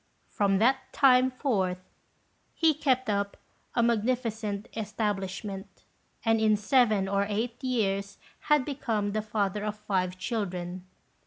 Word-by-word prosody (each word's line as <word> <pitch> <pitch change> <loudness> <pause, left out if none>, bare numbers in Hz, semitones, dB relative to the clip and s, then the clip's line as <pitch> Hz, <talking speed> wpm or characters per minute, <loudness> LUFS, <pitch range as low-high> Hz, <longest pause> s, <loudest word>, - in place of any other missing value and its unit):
From 200 -1 +2
that 260 +5 +2
time 260 -2 +5
forth 210 -9 0 0.8
he 320 -2 +4
kept 260 -3 +1
up 200 -1 -1 0.4
a 235 - +3
magnificent 225 -3 0
establishment; 205 -2 -4 0.4
and 225 -1 +3
in 215 -1 +4
seven 215 -3 +3
or 200 +1 +1
eight 230 +5 -3
years 200 -6 -1 0.3
had 300 -3 +4
become 225 -7 -1
the 215 +1 -1
father 210 -1 -1
of 210 0 -3
five 185 -3 -1
children. 185 -4 -4
215 Hz, 120 wpm, -28 LUFS, 200-245 Hz, 0.8 s, time